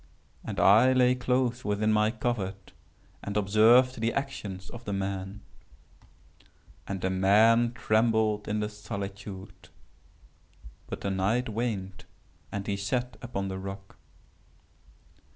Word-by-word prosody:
And -, -, -5 dB
I 115 Hz, +6 st, +6 dB
lay 125 Hz, -1 st, +4 dB
close 125 Hz, 0 st, 0 dB
within 105 Hz, +1 st, +1 dB
my 105 Hz, 0 st, +3 dB
covert 105 Hz, -5 st, -3 dB, 0.5 s
and 100 Hz, +1 st, -3 dB
observed 115 Hz, +5 st, +4 dB
the 115 Hz, +1 st, 0 dB
actions 105 Hz, -9 st, -5 dB
of 120 Hz, 0 st, -10 dB
the 100 Hz, -, -3 dB
man. 95 Hz, +1 st, -4 dB, 1.5 s
And 95 Hz, -2 st, -4 dB
the 95 Hz, -, 0 dB
man 110 Hz, +5 st, +4 dB
trembled 110 Hz, -2 st, +1 dB
in 105 Hz, +1 st, -1 dB
the 105 Hz, -, -2 dB
solitude;—but 100 Hz, -2 st, -8 dB, 1.3 s
the 100 Hz, -, -2 dB
night 105 Hz, +6 st, 0 dB
waned 105 Hz, -4 st, -4 dB, 0.5 s
and 100 Hz, -1 st, -4 dB
he 100 Hz, -1 st, -2 dB
sat 120 Hz, +5 st, -2 dB
upon 100 Hz, -6 st, -4 dB
the 95 Hz, 0 st, -5 dB
rock. 95 Hz, 0 st, -8 dB
105 Hz, 115 wpm, -28 LUFS, 95-120 Hz, 1.5 s, I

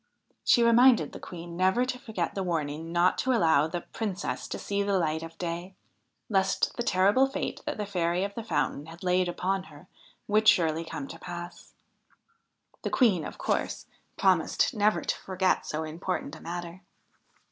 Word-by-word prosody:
She 235 Hz, -, +5 dB
reminded 235 Hz, +1 st, +5 dB
the -, -, -9 dB
Queen 170 Hz, -1 st, -8 dB
never 190 Hz, +7 st, +3 dB
to 255 Hz, 0 st, -4 dB
forget 215 Hz, -8 st, -3 dB
the 195 Hz, -, -3 dB
warning 165 Hz, -2 st, -2 dB
not 175 Hz, +1 st, +3 dB
to 260 Hz, -, +2 dB
allow 160 Hz, -, +4 dB
the 175 Hz, +2 st, -4 dB
Princess 200 Hz, -2 st, -4 dB
to -, -, -4 dB
see 200 Hz, 0 st, -2 dB
the 200 Hz, -1 st, +1 dB
light 160 Hz, -2 st, 0 dB
of 165 Hz, 0 st, -9 dB
day, 175 Hz, +2 st, -4 dB, 0.5 s
lest 195 Hz, -2 st, +1 dB
the -, -, -3 dB
terrible 205 Hz, +5 st, +4 dB
fate 270 Hz, -, -4 dB
that -, -, -2 dB
the 210 Hz, -, -2 dB
Fairy 180 Hz, -2 st, 0 dB
of 200 Hz, 0 st, -3 dB
the 230 Hz, -, -5 dB
Fountain 155 Hz, -8 st, -1 dB
had 165 Hz, +3 st, -11 dB
laid 180 Hz, 0 st, +2 dB
upon 185 Hz, +2 st, -1 dB
her 155 Hz, +2 st, -15 dB, 0.4 s
would 215 Hz, +1 st, +2 dB
surely 165 Hz, -3 st, +4 dB
come 145 Hz, -4 st, -6 dB
to -, -, -10 dB
pass. 175 Hz, 0 st, -8 dB, 1.1 s
The -, -, -2 dB
Queen, 205 Hz, -, +3 dB
of -, -, -7 dB
course, -, -, -2 dB, 0.3 s
promised -, -, +2 dB
never 210 Hz, -1 st, +2 dB
to -, -, 0 dB
forget 185 Hz, 0 st, 0 dB
so 155 Hz, +1 st, -2 dB
important 160 Hz, 0 st, -4 dB
a -, -, -13 dB
matter. 175 Hz, +1 st, -6 dB
180 Hz, 175 wpm, -28 LUFS, 165-205 Hz, 1.1 s, She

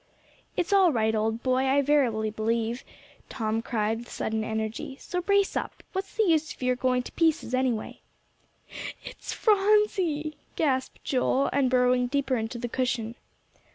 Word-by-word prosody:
"It's 360 Hz, +3 st, 0 dB
all 380 Hz, -4 st, +6 dB
right, 220 Hz, -4 st, +1 dB
old 220 Hz, +1 st, -1 dB
boy, 255 Hz, 0 st, +2 dB
I 280 Hz, +2 st, +3 dB
verily 245 Hz, -7 st, +2 dB
believe," 225 Hz, +2 st, -1 dB, 0.5 s
Tom 225 Hz, -2 st, -1 dB
cried 225 Hz, -1 st, -1 dB
with 240 Hz, -, -11 dB
sudden 220 Hz, 0 st, -2 dB
energy, 220 Hz, +4 st, -4 dB
"so 360 Hz, -, -3 dB
brace 400 Hz, +1 st, +2 dB
up; -, -, -4 dB
what's 385 Hz, 0 st, -4 dB
the 445 Hz, -, +4 dB
use 320 Hz, -5 st, +2 dB
of -, -, -9 dB
your 250 Hz, 0 st, +2 dB
going 250 Hz, 0 st, +1 dB
to -, -, -9 dB
pieces, 320 Hz, -6 st, +1 dB
anyway?" 255 Hz, -4 st, -1 dB, 1.0 s
"It's -, -, -8 dB
Phronsie," 390 Hz, -8 st, +2 dB, 0.2 s
gasped 265 Hz, -4 st, -1 dB
Joel, 265 Hz, +1 st, +1 dB
and 270 Hz, -2 st, +3 dB
burrowing 250 Hz, 0 st, +3 dB
deeper 270 Hz, 0 st, 0 dB
into 225 Hz, +1 st, -3 dB
the 240 Hz, +1 st, -3 dB
cushion. 240 Hz, -2 st, -1 dB
255 Hz, 155 wpm, -27 LUFS, 225-310 Hz, 1.0 s, all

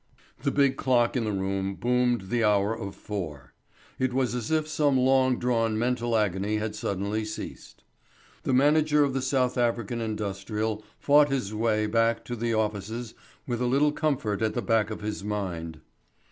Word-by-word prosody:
The -, -, +1 dB
big 140 Hz, -2 st, +2 dB
clock 120 Hz, -2 st, +2 dB
in 120 Hz, -3 st, 0 dB
the 105 Hz, -, -1 dB
room 95 Hz, 0 st, -2 dB
boomed 125 Hz, 0 st, +1 dB
the 120 Hz, -1 st, +2 dB
hour 105 Hz, 0 st, +3 dB
of 100 Hz, -3 st, -6 dB
four. 80 Hz, -11 st, -6 dB, 0.5 s
It 130 Hz, -1 st, 0 dB
was 130 Hz, -2 st, +1 dB
as 120 Hz, -3 st, -3 dB
if 155 Hz, -1 st, +1 dB
some 145 Hz, -3 st, +2 dB
long 130 Hz, 0 st, +3 dB
drawn 115 Hz, -3 st, +1 dB
mental 120 Hz, 0 st, 0 dB
agony 105 Hz, 0 st, 0 dB
had 105 Hz, 0 st, -3 dB
suddenly 100 Hz, +1 st, -2 dB
ceased. 110 Hz, 0 st, -8 dB, 0.6 s
The -, -, -2 dB
manager 150 Hz, +3 st, +4 dB
of 140 Hz, -2 st, 0 dB
the 135 Hz, -, -1 dB
South 130 Hz, -1 st, +1 dB
African 120 Hz, -1 st, 0 dB
Industrial 105 Hz, 0 st, -3 dB
fought 145 Hz, 0 st, +5 dB
his 125 Hz, -7 st, -2 dB
way 110 Hz, -1 st, +1 dB
back 115 Hz, +1 st, +1 dB
to 120 Hz, -, -4 dB
the 115 Hz, 0 st, -1 dB
offices 110 Hz, +1 st, -2 dB, 0.3 s
with 120 Hz, -1 st, -3 dB
a 125 Hz, -, +1 dB
little 140 Hz, +4 st, +3 dB
comfort 135 Hz, -9 st, -1 dB
at 110 Hz, -1 st, 0 dB
the -, -, -1 dB
back 110 Hz, -3 st, +2 dB
of 110 Hz, -, -6 dB
his 105 Hz, -1 st, -4 dB
mind. 90 Hz, -6 st, -4 dB
115 Hz, 175 wpm, -27 LUFS, 105-125 Hz, 0.6 s, fought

